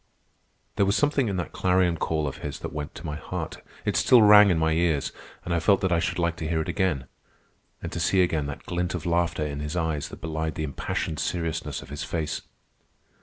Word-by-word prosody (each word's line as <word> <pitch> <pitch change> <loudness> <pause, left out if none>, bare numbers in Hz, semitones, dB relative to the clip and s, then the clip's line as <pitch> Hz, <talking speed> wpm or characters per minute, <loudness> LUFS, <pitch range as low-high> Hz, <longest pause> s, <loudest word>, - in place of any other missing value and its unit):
There 100 - +4
was 100 - +2
something 145 -4 +2
in 100 -2 -1
that 90 - -3
clarion 90 -2 +2
call 80 -1 -1
of 70 - -5
his - - -5
that - - -5
went 75 -1 -5
to 80 - -9
my 75 -1 -3
heart. - - -6 0.2
It - - 0
still 120 -3 +6
rang 105 -1 +9
in 90 - +3
my 80 0 +2
ears, 80 -3 +1 0.3
and 85 - -1
I 85 - +2
felt 100 +4 +4
that 95 - +1
I 85 - +3
should 85 - -1
like 85 -1 +1
to 80 - -4
hear 80 0 0
it 80 - -2
again—and 90 -9 -5
to - - -4
see 95 -1 +3
again 80 -5 0
that 70 - -7
glint 90 +1 -2
of 80 - -5
laughter 85 -2 +1
in 70 -1 -4
his 75 +3 -4
eyes 80 -4 -1
that - - -10
belied 80 0 -3
the 80 - -3
impassioned 75 +1 -3
seriousness 80 -4 -2
of - - -14
his 75 +1 -5
face. 80 0 -3
80 Hz, 220 wpm, -26 LUFS, 75-90 Hz, 0.3 s, rang